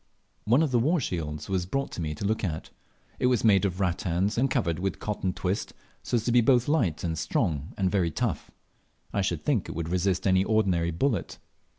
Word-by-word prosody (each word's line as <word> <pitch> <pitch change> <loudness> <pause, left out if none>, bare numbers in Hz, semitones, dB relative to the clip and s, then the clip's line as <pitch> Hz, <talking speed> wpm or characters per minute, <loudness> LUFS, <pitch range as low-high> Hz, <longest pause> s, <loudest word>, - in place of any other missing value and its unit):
One 125 +9 +4
of 150 - 0
the 120 - +3
war 155 +9 +2
shields 75 - -4
was 95 -2 -1
brought 135 -1 -3
me 75 -2 -3
to 100 - -5
look 110 +2 0
at. 80 -4 -3 0.5
It 125 - +3
was 125 -2 +2
made 105 -3 +5
of 95 -1 -2
rattans 90 +2 0
and 135 +3 +2
covered 90 - 0
with 95 +1 -2
cotton 100 -3 -2
twist, 90 +3 -3 0.3
so - - -2
as 115 -2 0
to 120 - +1
be 120 0 +5
both 120 0 +3
light, 120 - +1
strong, 80 0 -1
and 95 -2 +1
very 95 -5 +2
tough. 75 - -2 0.6
I 100 - +1
should 95 - -2
think 130 - +1
it - - -6
would 85 -1 -3
resist 90 +1 0
any 95 -1 +4
ordinary 95 -6 +1
bullet. 95 - -1
95 Hz, 205 wpm, -27 LUFS, 85-115 Hz, 0.6 s, made